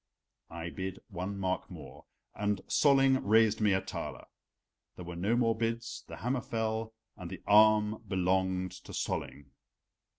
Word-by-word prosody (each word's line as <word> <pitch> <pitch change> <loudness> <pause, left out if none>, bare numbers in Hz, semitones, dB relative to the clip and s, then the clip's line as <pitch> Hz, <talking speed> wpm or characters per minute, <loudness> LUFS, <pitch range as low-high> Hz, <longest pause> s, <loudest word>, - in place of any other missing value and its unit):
I 85 +1 -6
bid 95 0 -5
one 95 +1 -4
mark 95 -1 -2
more, - - -11 0.3
and 105 -1 -1
Solling 135 -2 +4
raised 110 +1 +4
me 105 -2 +4
a 95 - +1
thaler. - - -6 0.7
There 90 - -9
were 85 0 -7
no 100 +7 +1
more 115 -2 +2
bids, 115 +1 -3
the - - -8
hammer 125 +1 -1
fell, 110 0 -3 0.2
and 90 -4 -7
the 95 -1 -8
arm 105 +1 +5
belonged 95 0 0
to - - -10
Solling. 70 -1 -4
105 Hz, 145 wpm, -31 LUFS, 95-115 Hz, 0.7 s, arm